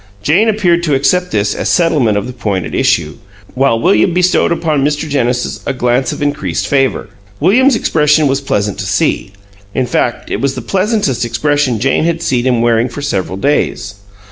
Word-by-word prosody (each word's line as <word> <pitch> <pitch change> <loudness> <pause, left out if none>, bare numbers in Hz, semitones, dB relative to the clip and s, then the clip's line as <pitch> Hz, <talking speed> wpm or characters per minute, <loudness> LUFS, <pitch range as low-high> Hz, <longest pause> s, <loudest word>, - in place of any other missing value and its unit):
Jane 180 - +3
appeared 180 -6 +1
to 155 -5 0
accept 180 +7 +1
this 105 - 0
as - - -3
settlement 150 - +2
of 100 - -2
the 125 - -7
point 100 -8 -2
at 80 - -7
issue, 75 -2 0 0.4
while 130 -3 +1
William 110 - +2
bestowed 180 -1 +2
upon 155 -4 0
Mr. 150 +2 -1
Genesis 125 -4 -1
a 140 - 0
glance 125 0 0
of - - -4
increased 100 - -2
favor. 135 -2 0 0.3
William's 245 - +4
expression 150 -6 +2
was 135 0 0
pleasant 105 -7 -2
to 95 - -3
see; 95 0 0 0.4
in 130 - +1
fact, - - -2
it 105 - -2
was 135 0 -1
the 130 - -5
pleasantest 195 - 0
expression 125 +1 0
Jane 135 +6 +1
had 170 0 -1
seen 125 -3 0
him 120 -2 +1
wearing 120 +1 +2
for 145 +5 -7
several 95 -8 -2
days. 115 -4 -1
135 Hz, 185 wpm, -14 LUFS, 115-160 Hz, 0.4 s, William's